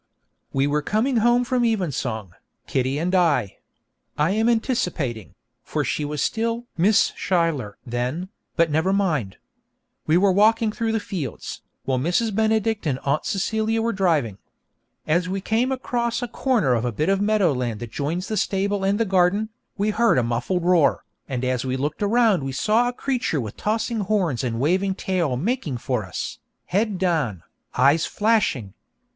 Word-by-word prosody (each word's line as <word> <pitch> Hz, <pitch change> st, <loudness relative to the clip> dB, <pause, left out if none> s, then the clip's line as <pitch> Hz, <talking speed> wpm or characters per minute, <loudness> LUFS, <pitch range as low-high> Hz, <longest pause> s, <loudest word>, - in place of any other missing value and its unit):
We 135 Hz, 0 st, +1 dB
were 150 Hz, +1 st, +1 dB
coming 230 Hz, -, +1 dB
home 240 Hz, +2 st, +4 dB
from 250 Hz, 0 st, 0 dB
evensong, 135 Hz, -, -1 dB, 0.3 s
Kitty 130 Hz, +1 st, 0 dB
and 175 Hz, +4 st, -1 dB
I. 150 Hz, -, +2 dB, 0.6 s
(I 150 Hz, +4 st, +2 dB
am 220 Hz, +3 st, +2 dB
anticipating, 220 Hz, -, -1 dB, 0.3 s
for -, -, -2 dB
she 150 Hz, -, -1 dB
was 150 Hz, 0 st, -2 dB
still 230 Hz, +1 st, -1 dB
'Miss 200 Hz, +6 st, +3 dB
Schuyler' 165 Hz, -, 0 dB
then, 125 Hz, +9 st, -3 dB, 0.3 s
but 165 Hz, -2 st, +2 dB
never 160 Hz, +5 st, +2 dB
mind.) 155 Hz, -, 0 dB, 0.7 s
We 155 Hz, +2 st, +4 dB
were 195 Hz, +1 st, +4 dB
walking 220 Hz, +3 st, +3 dB
through 225 Hz, 0 st, -2 dB
the 225 Hz, -, +1 dB
fields, 170 Hz, -, -5 dB, 0.2 s
while 130 Hz, -1 st, 0 dB
Mrs. 180 Hz, -, 0 dB
Benedict 220 Hz, -2 st, +1 dB
and 135 Hz, -4 st, 0 dB
Aunt 140 Hz, +2 st, 0 dB
Celia 220 Hz, +3 st, 0 dB
were 230 Hz, +1 st, 0 dB
driving. 155 Hz, -, +1 dB, 0.7 s
As 175 Hz, +4 st, +1 dB
we 195 Hz, +1 st, -1 dB
came 225 Hz, +6 st, 0 dB
across 245 Hz, -2 st, -1 dB
a -, -, -2 dB
corner 235 Hz, -, +1 dB
of 115 Hz, -, +1 dB
the 120 Hz, 0 st, -1 dB
bit 150 Hz, +9 st, -1 dB
of 195 Hz, 0 st, +2 dB
meadow 205 Hz, -6 st, +3 dB
land 120 Hz, -4 st, -2 dB
that 120 Hz, -2 st, -6 dB
joins 165 Hz, -, -2 dB
the 215 Hz, -, -2 dB
stable 200 Hz, 0 st, 0 dB
and 200 Hz, +2 st, +1 dB
the 230 Hz, -, +2 dB
garden, 190 Hz, +3 st, +2 dB, 0.3 s
we 210 Hz, +1 st, +1 dB
heard 230 Hz, -, +3 dB
a 125 Hz, -, +3 dB
muffled 120 Hz, +10 st, -1 dB
roar, 175 Hz, -6 st, +3 dB, 0.2 s
and 130 Hz, -2 st, -2 dB
as 125 Hz, -1 st, 0 dB
we 130 Hz, 0 st, -2 dB
looked 145 Hz, +6 st, -3 dB
around 215 Hz, -3 st, +3 dB
we 135 Hz, 0 st, -3 dB
saw 220 Hz, -, +2 dB
a -, -, 0 dB
creature 245 Hz, -, -1 dB
with 110 Hz, -5 st, -5 dB
tossing 225 Hz, +2 st, -1 dB
horns 185 Hz, -, 0 dB
and 115 Hz, -2 st, -2 dB
waving 185 Hz, +7 st, +1 dB
tail 175 Hz, -10 st, -1 dB
making 175 Hz, -, -1 dB
for 120 Hz, -2 st, -2 dB
us, 65 Hz, -9 st, -5 dB, 0.3 s
head 205 Hz, +1 st, 0 dB
down, 155 Hz, -, 0 dB, 0.3 s
eyes 150 Hz, +3 st, +4 dB
flashing. 205 Hz, -, +1 dB
180 Hz, 170 wpm, -23 LUFS, 135-220 Hz, 0.7 s, home